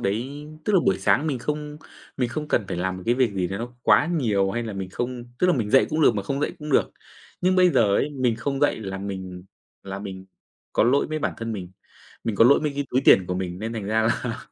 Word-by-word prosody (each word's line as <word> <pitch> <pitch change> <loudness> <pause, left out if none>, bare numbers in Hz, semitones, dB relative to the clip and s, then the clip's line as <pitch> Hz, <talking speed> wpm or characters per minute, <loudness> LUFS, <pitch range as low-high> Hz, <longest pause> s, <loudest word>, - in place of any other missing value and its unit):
đấy 130 +9 -3 0.2
tức 210 - 0
là 190 - +5
buổi 95 - +1
sáng 135 +9 +2
mình 140 -5 -1
không 150 +3 -4 0.4
mình 125 -3 0
không 150 +4 -5
cần 105 - +1
phải - - -3
làm 95 +1 -2
một 90 - -9
cái 120 - +3
việc 125 -4 +2
gì 95 -2 -1
đấy 95 +2 -4
nó 120 +2 -6
quá - - +5
nhiều 110 - +1
hay 120 +4 -2
là 115 -2 -5
mình 95 -1 -5
không 120 +3 -4
tức 180 - +3
là 180 - +4
mình 110 -6 -1
dậy 135 - +5
cũng 155 - 0
được 115 - +5
mà 100 - -2
không 135 +8 -3
dậy 150 - -1
cũng 150 0 -7
được. - - +3 0.5
Nhưng 185 +1 +2
bây 180 -1 +5
giờ 105 -8 +3
ấy, 150 - 0
mình 130 -5 0
không 135 +4 -3
dậy 145 - +2
là 95 -2 -5
mình 95 -2 -6 0.4
là 95 0 -6
mình 95 -2 -8 0.5
có - - +3
lỗi 135 +4 +3
với 155 0 -3
bản - - -2
thân 115 0 -4
mình, 95 -4 -6 0.5
mình 110 -3 -2
có 115 - +6
lỗi 130 +4 +6
mấy 150 -2 -1
cái 140 0 -2
túi 130 - +2
tiền 95 -2 +6
của 90 - -2
mình 90 -1 -4
nên 110 +3 -4
thành 110 -4 -4
ra 110 +2 +1
là 115 +1 -1
115 Hz, 270 wpm, -24 LUFS, 100-140 Hz, 0.5 s, có